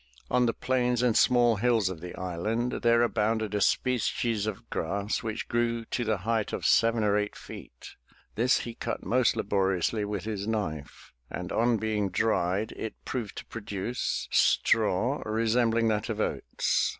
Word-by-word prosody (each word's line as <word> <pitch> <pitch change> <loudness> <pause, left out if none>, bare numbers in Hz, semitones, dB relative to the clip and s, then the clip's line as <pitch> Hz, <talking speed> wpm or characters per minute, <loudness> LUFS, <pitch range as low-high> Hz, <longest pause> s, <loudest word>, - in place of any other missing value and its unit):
On 125 -1 +3
the 115 - +1
plains 125 -1 0
and 120 -3 +2
small 120 -3 +4
hills 115 -2 +2
of 90 -4 -5
the 90 0 -7
island 105 +7 -2
there 115 0 +4
abounded 110 -2 0
a 105 - 0
species 115 -3 +1
of 110 +2 -5
grass 100 +5 -2
which 110 -1 -4
grew 115 -1 0
to 120 - -2
the 110 -2 0
height 115 -2 0
of - - -3
seven 115 -1 +4
or 105 -1 +2
eight 105 0 -3
feet. - - -11 0.4
This 120 +4 +2
he 120 - -6
cut 115 0 -5
most 125 -1 +2
laboriously 100 0 0
with 105 -2 -3
his 105 -2 -4
knife, 80 -10 -4 0.2
and, 90 0 -5
on 120 0 +2
being 105 -2 -1
dried, 100 0 0
it 110 - -6
proved 115 -5 -4
to - - -6
produce 105 +1 -3
straw 115 +5 +2
resembling 115 +1 +1
that 105 +1 -1
of 110 -1 -3
oats. 70 -9 0
110 Hz, 160 wpm, -28 LUFS, 100-115 Hz, 0.4 s, small